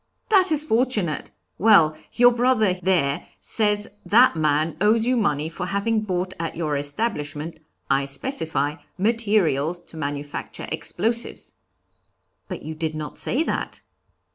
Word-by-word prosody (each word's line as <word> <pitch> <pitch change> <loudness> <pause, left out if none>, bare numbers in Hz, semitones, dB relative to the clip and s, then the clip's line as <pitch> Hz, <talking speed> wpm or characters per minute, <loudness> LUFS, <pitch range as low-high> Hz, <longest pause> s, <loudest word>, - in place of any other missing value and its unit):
'That 380 -5 +4
is 305 -1 +2
fortunate. 225 - 0 0.3
Well, 180 -7 +6 0.2
your 245 0 +6
brother 240 -5 +3
there 180 -6 0
says 210 -1 0 0.2
that 240 -1 +5
man 155 0 +1
owes 220 +2 +4
you 255 +1 +2
money 155 -10 +1
for 175 +2 -5
having 215 +3 0
bought 185 -3 -2
at 165 -1 -3
your 155 -3 -1
establishment 150 0 -3 0.3
I 135 0 +2
specify 150 - -1 0.2
materials 195 - +1
to 170 - -14
manufacture 145 -1 -5
explosives.' 230 +1 -2 0.9
'But - - -6
you 160 - -5
did 155 0 -3
not 155 -1 -6
say 285 +6 +1
that.' - - -4
180 Hz, 130 wpm, -23 LUFS, 155-225 Hz, 0.9 s, Well